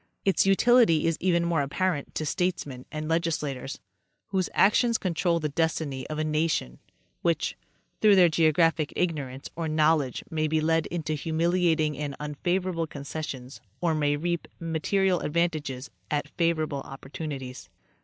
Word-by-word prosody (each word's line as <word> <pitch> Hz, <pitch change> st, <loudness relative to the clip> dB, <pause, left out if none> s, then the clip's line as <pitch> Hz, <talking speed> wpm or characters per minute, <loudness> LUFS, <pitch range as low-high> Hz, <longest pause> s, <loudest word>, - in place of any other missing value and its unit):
Its 195 Hz, 0 st, +3 dB
utility 210 Hz, -4 st, +5 dB
is 165 Hz, -1 st, +2 dB
even 170 Hz, -2 st, +2 dB
more 170 Hz, -3 st, +1 dB
apparent 145 Hz, +2 st, -1 dB
to 155 Hz, -, -2 dB
statesmen 150 Hz, -7 st, -2 dB
and 155 Hz, 0 st, -4 dB
legislators, 150 Hz, -5 st, -1 dB, 0.5 s
whose 190 Hz, -2 st, 0 dB
actions 230 Hz, +3 st, +4 dB
control 175 Hz, -2 st, 0 dB
the 155 Hz, -, -1 dB
destiny 150 Hz, -3 st, -1 dB
of 155 Hz, -, -4 dB
a 155 Hz, -, 0 dB
nation, 155 Hz, -, -1 dB, 0.4 s
which, -, -, 0 dB, 0.5 s
through 210 Hz, -2 st, +7 dB
their 180 Hz, -2 st, +7 dB
geographic 160 Hz, -1 st, +2 dB
ignorance 140 Hz, -7 st, -2 dB
or 165 Hz, -1 st, -2 dB
knowledge 155 Hz, -4 st, +2 dB
may 155 Hz, -1 st, 0 dB
be 155 Hz, +1 st, +1 dB
led 160 Hz, +1 st, +1 dB
into 160 Hz, -3 st, -3 dB
humiliating 160 Hz, 0 st, +1 dB
and 145 Hz, -2 st, -3 dB
unfavorable 165 Hz, +3 st, -1 dB
concessions 140 Hz, -5 st, -6 dB, 0.2 s
or 170 Hz, -2 st, +1 dB
may 145 Hz, -1 st, +1 dB
reap 170 Hz, +3 st, -2 dB
mate 165 Hz, -2 st, -3 dB
rial 195 Hz, -3 st, +3 dB
advantages 150 Hz, -5 st, -1 dB, 0.2 s
at 150 Hz, 0 st, -1 dB
favorable 155 Hz, -4 st, 0 dB
opportunities. 135 Hz, -1 st, -7 dB
160 Hz, 140 wpm, -27 LUFS, 145-170 Hz, 0.5 s, through